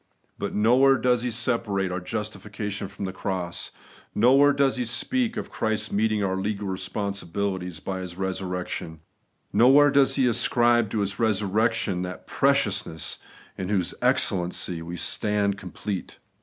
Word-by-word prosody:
But - - -3
nowhere 130 +6 +5
does 125 -2 +2
he 125 - -1
separate 110 -5 -1
our 90 - -2
justification 105 0 -5
from 100 0 -6
the 95 - -4
cross; 95 -3 -4 0.5
nowhere 135 +6 +6
does 140 -2 +2
he 125 - -1
speak 230 - -1
of - - -5
Christ 110 -1 -2
meeting 110 0 +1
our 95 0 -1
legal 100 +1 -2
responsibilities 95 -2 -3
by 95 +3 -4
His 90 -1 -7
resurrection; 90 -4 -4 0.5
nowhere 135 +6 +6
does 140 -1 +4
he 135 - +3
ascribe 120 -1 +3
to 105 0 -1
His 100 0 -2
resurrection 110 -2 +1
that 90 0 -6
preciousness 80 -2 0 0.4
in 95 - -3
whose 95 -5 0
excellency 90 -2 0
we 85 +2 -6
stand 100 +1 0
complete. 95 +1 -6
105 Hz, 140 wpm, -25 LUFS, 95-120 Hz, 0.5 s, nowhere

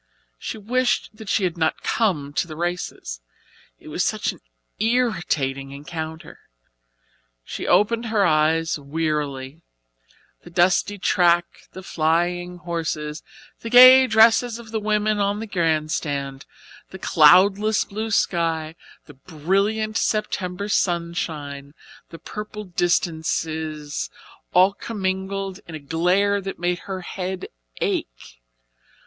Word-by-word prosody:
She 225 - -5
wished 245 +2 0
that 220 -2 -10
she 205 - +1
had 175 -2 -1
not 160 -1 0
come 150 -11 0
to 170 - -1
the 155 - -8
races. 170 - -4 0.6
It - - -13
was - - -1
such - - 0
an - - -15 0.4
irritating 175 - 0
encounter. 160 +3 -7 1.0
She - - -6
opened 225 +5 +2
her 215 -3 +2
eyes 160 0 +2
wearily; 145 -1 -3 0.8
the - - -13
dusty 180 +4 +2
track, 175 -2 +3 0.3
the 190 - -9
flying 175 +2 0
horses, 165 -3 -4 0.4
the 230 - -6
gay 255 +2 +9
dresses 225 +1 +4
of 230 -2 -12
the 220 - -1
women 210 0 0
on 200 +1 0
the 225 - -4
grandstand, 155 -6 -2 0.4
the 190 - -9
cloudless 195 +6 +5
blue 220 +2 -5
sky, 165 -6 0 0.3
the 145 - -13
brilliant 195 +9 -1
September 200 -2 -2
sunshine, 160 -6 -2 0.3
the 165 - -10
purple 210 +5 -7
distances 160 - -2 0.4
all 185 +2 +5
commingled 195 -2 -3
in 165 - -8
a - - -6
glare 180 +7 +1
that 195 0 -6
made 175 0 -1
her 190 -1 -4
head 185 +1 -5 0.4
ache. - - -3
175 Hz, 120 wpm, -23 LUFS, 155-205 Hz, 1.0 s, gay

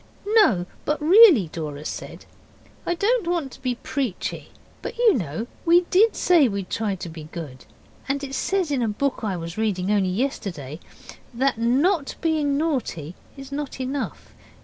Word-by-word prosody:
'No, 405 - +4 0.2
but 300 - -1
really,' 325 - +7
Dora 150 -2 -5
said, - - -7 0.6
'I 345 - +1
don't 435 +1 +1
want 335 -6 -1
to - - -14
be 255 -2 -1
preachy 260 -5 -4 0.3
but - - -6
you 470 -3 +5
know 175 - -3 0.2
we 345 +1 +5
DID 430 +5 +4
say 335 -7 +4
we'd 200 -4 -4
try 210 -3 -1
to 180 -1 -7
be 160 -2 -9
good. 150 -6 -9 0.4
And 280 +1 -1
it 270 -1 -6
says 370 +2 0
in 270 -3 0
a 230 - +1
book 255 +6 -1
I 200 -5 -2
was 170 +3 -6
reading 200 -3 0
only 200 -3 +2
yesterday 180 - -3 0.6
that 260 -1 +1
NOT 280 +7 +1
being 300 -4 +1
naughty 250 - -2 0.2
is 275 0 -10
not 280 -1 -5
enough. 265 +1 -4
260 Hz, 165 wpm, -23 LUFS, -, 0.6 s, really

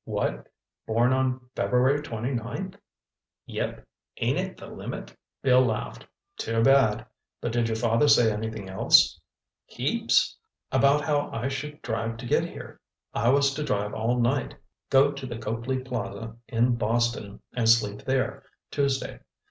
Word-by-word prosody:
"What? - - -2 0.4
Born 120 +3 +3
on 130 -1 0
February 130 +4 +2
twenty 120 -1 -4
ninth?" 115 -1 -4 0.7
"Yep—ain't - - -4
it - - -4
the - - -10
limit?" - - -7 0.3
Bill 130 -1 +5
laughed. 105 - -3 0.3
"Too 115 0 0
bad. 135 -5 +4 0.3
But 120 - -3
did 120 0 +1
your 110 - 0
father 115 +5 +2
say 120 -5 +6
anything 110 -1 -5
else?" 95 0 +4 0.5
"Heaps. - - +1 0.4
About 140 +2 +4
how 145 -1 0
I 120 +4 -2
should 150 +2 -6
drive 115 0 -2
to 120 - -8
get - - +2
here. - - -10 0.3
I 115 - +2
was 140 +1 +4
to 150 - -3
drive 105 -6 -1
all 120 +3 0
night, 125 +3 0 0.3
go 135 +1 +5
to 140 -2 -7
the 120 -2 -5
Copley 115 +4 -2
Plaza 115 -4 -5
in 120 +1 +2
Boston 115 -2 -1
and 115 -2 +1
sleep 105 -3 +3
there 135 +1 -1 0.3
Tuesday. 140 -2 -1
120 Hz, 145 wpm, -26 LUFS, 110-135 Hz, 0.7 s, say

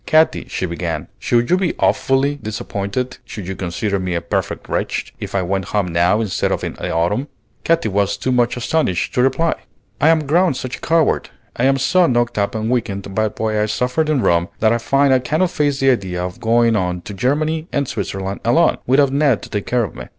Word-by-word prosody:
"Katy," 160 +1 +3
she - - -2
began, 85 -2 -4
"should 120 +3 +1
you 180 - +5
be 185 -3 -1
awfully 135 +2 +2
disappointed, 110 +1 -4
should 100 -5 -8
you 95 - -4
consider 95 +3 -2
me 90 -1 -2
a - - +1
perfect - - -3
wretch, - - -2
if - - -6
I 95 - +1
went 95 +1 -1
home 100 -2 -1
now 85 +5 +2
instead 100 -5 -1
of - - -1
in - - -3
the - - -5
autumn?" 95 - 0 0.4
Katy 165 -7 +2
was 100 -1 0
too 130 - -1
much 120 -1 +2
astonished 125 - 0
to 125 - +2
reply. 145 +6 +2 0.5
"I 155 - +5
am 160 -2 +3
grown 170 +2 +3
such 130 0 -5
a - - -20
coward, 165 -2 +1 0.3
I 125 - +1
am 135 0 +4
so 175 +7 +3
knocked 120 -3 +1
up 100 +2 -1
and 110 +1 -1
weakened 100 -5 -2
by 110 +2 +1
what 110 +1 -3
I 105 0 +1
suffered 125 +8 0
in 150 -4 +2
Rome, 85 +1 +2
that 110 +1 +3
I 120 - 0
find 135 +3 +3
I 130 - +4
cannot 155 +8 0
face 145 -2 0
the 135 0 +5
idea 90 -6 -2
of 90 0 -7
going 115 0 +3
on 90 -3 -1
to 105 - -8
Germany 155 - 0
and 140 -2 0
Switzerland 95 -3 -4
alone, - - +3
without 135 +2 +4
Ned 140 -5 +2
to - - -9
take 105 -1 -3
care 125 -1 +1
of 105 - -5
me. - - -8
120 Hz, 220 wpm, -19 LUFS, 100-140 Hz, 0.5 s, you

